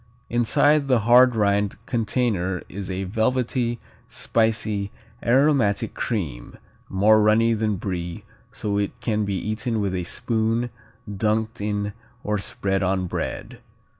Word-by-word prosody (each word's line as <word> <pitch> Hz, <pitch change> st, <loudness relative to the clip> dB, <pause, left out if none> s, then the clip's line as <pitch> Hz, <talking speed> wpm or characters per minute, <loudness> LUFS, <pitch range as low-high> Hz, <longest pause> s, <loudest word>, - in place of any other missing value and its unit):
Inside 140 Hz, +5 st, +3 dB
the 125 Hz, -4 st, +3 dB
hard 120 Hz, +2 st, +6 dB
rind 100 Hz, -1 st, +1 dB
container 110 Hz, -6 st, -1 dB
is 100 Hz, 0 st, -6 dB
a 95 Hz, +1 st, -2 dB
velvety, 120 Hz, +3 st, 0 dB, 0.3 s
spicy, 110 Hz, -3 st, 0 dB, 0.3 s
aromatic 125 Hz, -5 st, +2 dB
cream, 75 Hz, -, -4 dB, 0.3 s
more 105 Hz, +3 st, +4 dB
runny 110 Hz, +2 st, +4 dB
than 110 Hz, -1 st, 0 dB
Brie, 90 Hz, -3 st, -4 dB, 0.3 s
so 100 Hz, -1 st, -2 dB
it 100 Hz, -, -3 dB
can 110 Hz, -2 st, 0 dB
be 100 Hz, -1 st, -2 dB
eaten 110 Hz, +4 st, -2 dB
with 100 Hz, -2 st, -1 dB
a 90 Hz, -1 st, -2 dB
spoon, 115 Hz, +5 st, -1 dB, 0.4 s
dunked 110 Hz, +2 st, -1 dB
in, 105 Hz, 0 st, -2 dB, 0.3 s
or 105 Hz, -1 st, -1 dB
spread 95 Hz, -1 st, -1 dB
on 95 Hz, 0 st, 0 dB
bread. 90 Hz, -, -5 dB
105 Hz, 125 wpm, -23 LUFS, 100-115 Hz, 0.4 s, hard